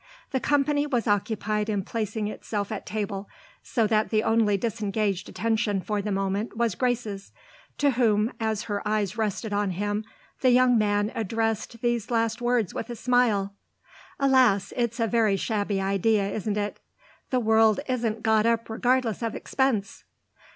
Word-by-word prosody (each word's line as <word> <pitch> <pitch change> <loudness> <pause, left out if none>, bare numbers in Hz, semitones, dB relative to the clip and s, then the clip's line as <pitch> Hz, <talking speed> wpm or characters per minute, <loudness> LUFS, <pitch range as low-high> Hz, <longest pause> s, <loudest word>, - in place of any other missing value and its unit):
The 265 - +1
company 290 +2 +1
was 245 -5 0
occupied 210 +1 0
in 205 -2 0
placing 215 0 -3
itself 210 -1 -4
at 215 - -5
table, 205 -2 -4 0.3
so 230 -3 0
that 215 0 +1
the 215 -1 +1
only 220 -3 +3
disengaged 210 -3 -2
attention 215 +1 0
for 210 +2 -2
the 210 +1 -3
moment 195 +3 -2
was 235 -3 +1
Grace's, 225 -3 -2 0.5
to 285 -1 +3
whom, 225 -2 +2
as 220 -2 -1
her 205 -2 -3
eyes 210 -2 -1
rested 215 -1 -2
on 205 -1 +1
him, 205 +3 -2 0.4
the 255 - +3
young 250 0 +5
man 205 -1 +1
addressed 225 +1 -2
these 240 -2 0
last 230 0 0
words 240 -5 +1
with 230 - -5
a 240 - -4
smile. 225 -5 +2 0.7
"Alas, 255 -8 +3
it's 235 -1 -1
a 230 - +3
very 225 -3 +2
shabby 205 -2 -1
idea, 195 +2 +1
isn't 210 0 -2
it? 205 0 -3 0.5
The 255 - +1
world 220 -2 +4
isn't 230 -4 -1
got 220 -1 +3
up 230 -1 0
regardless 245 -1 +1
of 230 -1 -2
expense!" 250 -7 -1
220 Hz, 160 wpm, -26 LUFS, 205-235 Hz, 0.7 s, young